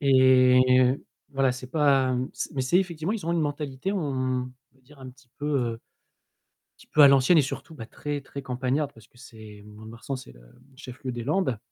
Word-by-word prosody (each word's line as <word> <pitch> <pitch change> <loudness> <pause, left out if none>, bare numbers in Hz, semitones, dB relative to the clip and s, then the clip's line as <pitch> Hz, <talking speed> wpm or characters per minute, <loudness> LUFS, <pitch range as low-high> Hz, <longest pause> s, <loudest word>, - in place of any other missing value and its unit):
Et 130 -2 +5 0.2
heu, 130 +2 +1 0.3
voilà 135 -2 +2
c'est 125 +1 -9
pas, 140 -4 +3
hem 125 0 -2
c'est - - -5
mais 130 - -1
c'est 150 +8 +2
effectivement 175 -1 -2
ils 215 -7 -5
ont 170 - 0
une 170 - +1
mentalité, 145 +3 -3
on 130 -8 -1 0.3
va 135 - -30
dire 140 +3 -20
un 130 -1 -10
petit 130 0 -23
peu, 145 - -4
heu, 130 -6 0
un - - -12 1.0
petit - - -19
peu 155 - +1
à 140 - +10
l'ancienne 140 +5 +5
et - - +5
surtout 140 +4 -6
bah 115 -7 -9
très, 145 +4 -5
très 140 0 -9
campagnarde 130 +3 -2
parce 115 -5 -18
que 120 - -24
c'est, 110 -4 -13
Mont-de-Marsan 110 +5 -8
c'est 130 - -12
le, - - -19
hem, - - -21 0.2
chef 125 -1 -11
lieu 130 - -3
des 120 -1 -5
Landes 145 - 0
130 Hz, 220 wpm, -26 LUFS, 125-145 Hz, 1.0 s, à